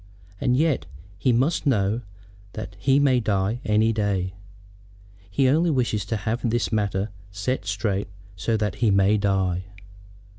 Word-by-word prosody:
And 125 -1 +2
yet 145 - +1 0.3
he 125 - +2
must 135 +6 +1
know 110 -2 +2 0.5
that 110 -2 -7
he 135 +6 +3
may 135 -3 +4
die 105 +1 0
any 110 +2 +2
day. 100 -4 -1 1.0
He 130 +8 +2
only 160 +6 +3
wishes 120 - 0
to 110 +2 -2
have 115 +4 -1
this 120 0 0
matter 100 -1 0 0.2
set 100 +1 -3
straight 100 0 -1 0.3
so 110 +4 0
that 105 -3 -1
he 115 - +4
may 100 +1 +4
die. 95 -3 0
110 Hz, 145 wpm, -24 LUFS, 100-125 Hz, 1.0 s, may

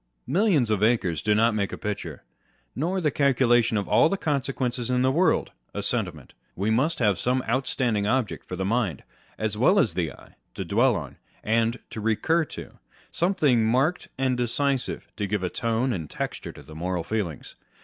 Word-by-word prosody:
Millions 155 - +2
of 105 -2 +1
acres 105 -9 +2
do 105 +3 +2
not 115 +1 +3
make 100 -2 -1
a - - -5
picture; 105 -1 -5 0.5
nor 175 +7 -1
the 155 -5 +1
calcu 135 -2 +2
lation 120 -2 +4
of 100 - -4
all 160 - +5
the 195 - 0
consequences 130 -6 -1
in 125 0 +2
the 130 - +3
world 175 +7 +2 0.2
a - - -2
sentiment. - - -3 0.2
We 100 +4 0
must 140 +9 +1
have 105 -7 +2
some 125 +1 +1
outstanding 120 -4 0
object 125 -2 -1
for 90 - -4
the 95 +1 -2
mind, 105 - 0 0.3
as 110 -1 -2
well 180 - +5
as 120 - +3
the 85 -3 -1
eye, - - -16 0.2
to - - -4
dwell - - +3
on - - -6 0.3
and 115 +2 +1
to 110 - -5
recur 155 +10 +1
to - - -8
â€" - - -19 0.4
something 155 - +2
marked 130 +10 +1
and 130 -1 +1
decisive 130 +2 -1
to 105 - -1
give 105 -1 -1
a 90 - -1
tone 115 +2 0
and 80 -6 -5
texture - - -5
to - - -13
the 80 - -13
moral 90 +2 -2
feelings. 95 -9 -4
120 Hz, 190 wpm, -25 LUFS, 105-135 Hz, 0.5 s, all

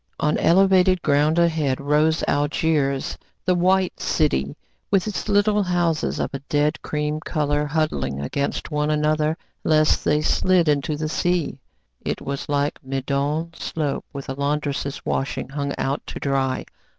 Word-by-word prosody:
On 150 0 +2
elevated 185 0 +4
ground 150 +3 +3
ahead 160 -6 +2
rose 150 +3 +2
Algiers, 145 -2 0 0.3
the 185 - +3
White 185 +1 +2
City, 70 - 0 0.3
with 195 -3 +2
its 215 0 -4
little 205 +1 +3
houses 175 -4 0
of - - -2
a 140 - -3
dead 150 +1 +1
cream 150 0 -2
colour 150 -2 -1
huddling 150 - -1
against 140 - -3
one 150 0 0
another 155 +1 +1 0.3
lest 155 -1 +3
they 150 +1 +2
slid 180 +1 +3
into 150 0 +1
the 155 +1 -2
sea. 175 -4 0 0.4
It - - -2
was 140 +1 -5
like 145 0 -1
Meudon 140 +5 -2
slope 150 -4 -3
with 140 -1 -7
a 135 - -3
laundress's 140 0 -2
washing 135 -1 -2
hung 140 0 -3
out 135 +2 -1
to - - -6
dry. 135 -2 0
150 Hz, 145 wpm, -23 LUFS, 140-165 Hz, 0.4 s, elevated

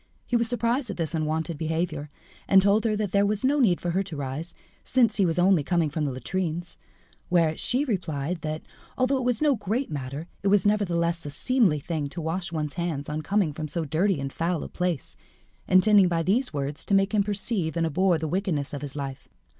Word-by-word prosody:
He 245 - -1
was 235 -1 +2
surprised 240 +2 0
at 200 - -5
this 165 -2 -2
unwonted 160 0 -2
behaviour, 160 -2 -2 0.4
and 195 - +7
told 205 +3 +3
her 215 -2 +2
that 210 -3 -2
there 200 0 +3
was 205 +4 0
no 290 +2 +3
need 195 -10 +3
for 175 - -2
her 190 +3 +1
to 185 -5 -6
rise, 145 +4 -4 0.3
since 235 -4 +2
he 195 -3 +3
was 165 0 -1
only 180 -3 +4
coming 165 -1 +1
from 150 0 -1
the 140 - -1
latrines; 175 +5 -3 0.5
whereat 165 -3 +2
she 260 +5 +2
replied 170 - -2
that, 155 0 -4 0.3
although 255 +1 +2
it 260 - -2
was 245 +1 +1
no 295 -2 +5
great 225 +4 -2
matter, 140 +2 -5 0.2
it 200 - -1
was 200 -1 +4
nevertheless 170 -5 +1
a 145 - -5
seemly 195 - +2
thing 150 -1 -3
to 160 - -6
wash 170 +3 -2
one's 150 -3 -3
hands 165 -5 -3
on 150 +1 -2
coming 190 -1 +1
from 155 +1 -4
so 165 +2 -2
dirty 165 +4 +1
and 135 0 -4
foul 170 0 -1
a - - -5
place, 180 -5 -2 0.5
intending 190 +1 +6
by 165 -1 0
these 235 +9 +1
words 145 0 -3
to 200 - +1
make 195 +2 +2
him 210 - +4
perceive 195 -4 -1
and 165 - +2
abhor 175 +3 +2
the 160 0 -3
wickedness 170 -5 -1
of 140 - -4
his 145 -1 -6
life. 135 -2 -6
175 Hz, 215 wpm, -26 LUFS, 155-205 Hz, 0.5 s, and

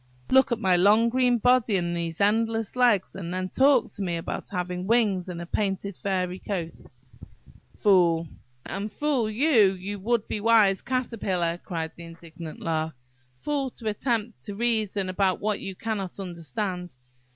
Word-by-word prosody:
Look 265 0 +5
at 235 - +1
my 190 -5 +3
long 210 +5 +5
green 250 0 +3
body 240 -3 +3
and 175 -1 -1
these 170 -1 -4
endless 225 +2 +1
legs, 240 -6 +3
and 175 -3 -6
then 185 0 -2
talk 270 +1 +4
to - - -8
me 175 -3 -1
about 165 - -5
having 180 -1 -3
wings 205 -6 +2
and 175 -2 -5
a 170 - -5
painted 195 +1 -2
feathery 185 -1 -2
coat! 175 -5 -3 1.0
Fool!–" 170 -5 +3 0.4
"And 205 +2 -4
fool 265 -3 0
you! 220 -4 +4
you 195 +2 -6
would 230 +2 0
be 210 - -3
wise 210 -4 +4
Caterpillar!" 200 -9 -1
cried 160 -2 -4
the 170 - -11
indignant 165 -1 -10
lark. 160 -2 -2 0.4
"Fool, 280 - -2
to 230 -3 -5
attempt 230 0 -2
to 205 - -5
reason 215 -4 0
about 185 0 +1
what 210 -1 -1
you 195 - -6
cannot 200 -3 -4
understand! 180 0 -4
200 Hz, 160 wpm, -26 LUFS, 180-230 Hz, 1.0 s, Look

